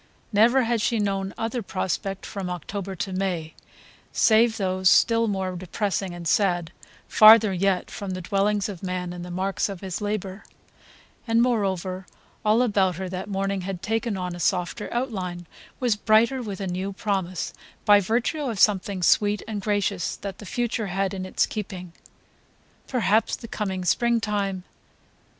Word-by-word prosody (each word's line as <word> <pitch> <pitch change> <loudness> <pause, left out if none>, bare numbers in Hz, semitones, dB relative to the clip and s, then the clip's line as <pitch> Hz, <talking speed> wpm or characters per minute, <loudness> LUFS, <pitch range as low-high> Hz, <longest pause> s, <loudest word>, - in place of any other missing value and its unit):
Never 240 +5 +5
had 235 -1 0
she 230 - +1
known 195 -2 -1
other 230 +2 -2
prospect 195 0 -3
from 195 -3 -5
October 190 +2 -5
to 190 +1 -4
May, 180 -4 -2 0.6
save 225 0 +4
those 185 -2 +2
still 230 +2 +4
more 190 -3 -2
depressing 190 +1 -2
and 170 -1 -6
sad, 175 -3 +1 0.4
farther 215 -1 +8
yet 185 0 0
from 200 -2 -6
the 185 - -5
dwellings 200 +2 +1
of 195 -5 -7
man 180 -1 -3
and 175 -1 -7
the 180 - -8
marks 190 +3 -1
of 195 -3 -7
his 190 -1 -4
labour; 205 -1 -3 0.8
and 225 0 +3
moreover 190 -6 0 0.4
all 220 +3 +4
about 195 -6 +2
her 185 +1 -5
that 185 +2 -5
morning 195 0 -1
had 185 -1 -5
taken 225 -1 -1
on 180 -1 -4
a - - -9
softer 180 +4 -1
outline, 190 -8 -3 0.3
was 245 -4 +2
brighter 225 +5 +3
with 205 -5 -6
a 195 - -3
new 190 +2 -3
promise, 190 -3 -2 0.3
by 205 -1 +7
virtue 235 - 0
of 235 -8 -3
something 195 -2 +2
sweet 205 +4 +3
and 210 -2 -4
gracious 200 -3 -1
that 195 -2 -7
the 210 - -9
future 235 -2 -2
had 195 +1 -1
in 185 -1 -4
its - - +1
keeping. 185 -5 -6 0.9
Perhaps 225 -3 +2
the 230 - -10
coming 190 -4 -3
springtime 210 -3 0
195 Hz, 160 wpm, -25 LUFS, 185-215 Hz, 0.9 s, farther